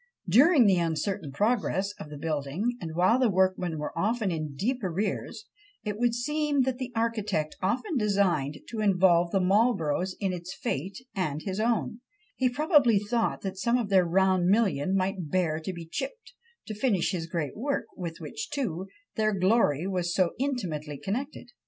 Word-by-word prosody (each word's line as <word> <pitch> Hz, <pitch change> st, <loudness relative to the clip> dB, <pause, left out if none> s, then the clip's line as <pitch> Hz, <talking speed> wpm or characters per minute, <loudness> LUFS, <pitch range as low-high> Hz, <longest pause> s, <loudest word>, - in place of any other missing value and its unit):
During 280 Hz, +1 st, +6 dB
the 190 Hz, -3 st, +4 dB
uncertain 165 Hz, 0 st, -2 dB
progress 200 Hz, -, 0 dB
of 150 Hz, -, -8 dB
the 150 Hz, -, -8 dB
building, 155 Hz, -, -2 dB
and 160 Hz, -2 st, -5 dB
while 185 Hz, +8 st, +4 dB
the 255 Hz, -3 st, +3 dB
workmen 185 Hz, -3 st, +1 dB
were 150 Hz, -, -5 dB
often 215 Hz, +2 st, 0 dB
in 155 Hz, -3 st, -4 dB
deep 245 Hz, -, -1 dB
arrears, 200 Hz, +4 st, -3 dB, 0.4 s
it 210 Hz, -1 st, -4 dB
would 240 Hz, -1 st, +2 dB
seem 295 Hz, +2 st, +1 dB
that 260 Hz, 0 st, -2 dB
the 255 Hz, -1 st, -4 dB
architect 215 Hz, -8 st, -1 dB
often 260 Hz, -, 0 dB
designed 195 Hz, -, +1 dB
to 225 Hz, -, -5 dB
involve 180 Hz, -4 st, +4 dB
the 195 Hz, -, +1 dB
Marlboroughs 185 Hz, -3 st, +2 dB
in 190 Hz, -2 st, -1 dB
its 180 Hz, +2 st, -6 dB
fate 190 Hz, -, -4 dB
and 155 Hz, -7 st, -2 dB
his 190 Hz, 0 st, -3 dB
own; 230 Hz, +1 st, 0 dB, 0.3 s
he 255 Hz, -, +2 dB
probably 285 Hz, -, +4 dB
thought 220 Hz, +3 st, 0 dB
that 190 Hz, -1 st, -5 dB
some 235 Hz, +4 st, +2 dB
of 230 Hz, -5 st, -2 dB
their 190 Hz, -2 st, +5 dB
round 185 Hz, +1 st, +2 dB
million 195 Hz, -5 st, +2 dB
might 185 Hz, -3 st, -1 dB
bear 160 Hz, -2 st, +1 dB
to 160 Hz, +4 st, -4 dB
be 170 Hz, -2 st, -8 dB
chipped, 480 Hz, -, -6 dB, 0.3 s
to 215 Hz, -, -5 dB
finish 210 Hz, -6 st, +1 dB
his 170 Hz, -4 st, -3 dB
great 165 Hz, -4 st, -3 dB
work, 275 Hz, +6 st, -2 dB
with 170 Hz, -3 st, -5 dB
which, 155 Hz, -3 st, -6 dB
too, 190 Hz, -, -3 dB, 0.3 s
their 215 Hz, -1 st, +2 dB
glory 185 Hz, -, +3 dB
was 180 Hz, -2 st, -1 dB
so 185 Hz, -3 st, +3 dB
intimately 170 Hz, -, -2 dB
connected. 240 Hz, -, -5 dB
195 Hz, 170 wpm, -28 LUFS, 170-235 Hz, 0.4 s, During